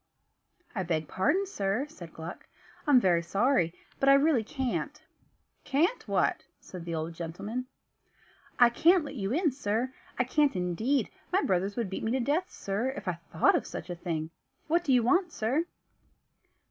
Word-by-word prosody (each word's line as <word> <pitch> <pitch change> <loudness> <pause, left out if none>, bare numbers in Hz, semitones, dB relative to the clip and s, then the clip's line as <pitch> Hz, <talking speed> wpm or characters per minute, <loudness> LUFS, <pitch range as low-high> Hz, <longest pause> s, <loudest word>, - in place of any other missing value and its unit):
"I 195 - -2
beg 160 -4 -1
pardon, 370 - +1
sir," 210 - -1
said 175 - -11
Gluck, 165 +2 -8 0.4
"I'm 280 -4 +7
very 175 -6 +3
sorry, 195 0 +2 0.3
but 275 - +4
I 275 - +9
really 280 -4 +3
can't." 255 +3 -3 0.6
"Can't 340 - +1
what?" - - +1 0.2
said 180 -3 -9
the 170 -1 -3
old 160 +1 -3
gentleman. 200 +10 -5 0.9
"I 240 -1 +7
can't 335 +6 +4
let 280 - -7
you 200 -6 -3
in, 320 +3 +2
sir 250 0 -1 0.2
I 250 - +3
can't 290 +1 +2
indeed; 185 +10 0 0.2
my 380 +2 +2
brothers 190 +2 0
would 230 -6 -2
beat - - -4
me 220 - 0
to 265 - +1
death, 295 +9 0
sir, 205 +6 -2
if - - -7
I 180 - +1 0.2
thought 160 - +4
of - - -1
such - - -6
a - - -3
thing. 165 -2 -3 0.3
What 340 +2 +2
do 285 - 0
you 250 -2 +5
want, 355 - +3
sir?" 270 +7 0
235 Hz, 170 wpm, -29 LUFS, 180-285 Hz, 0.9 s, I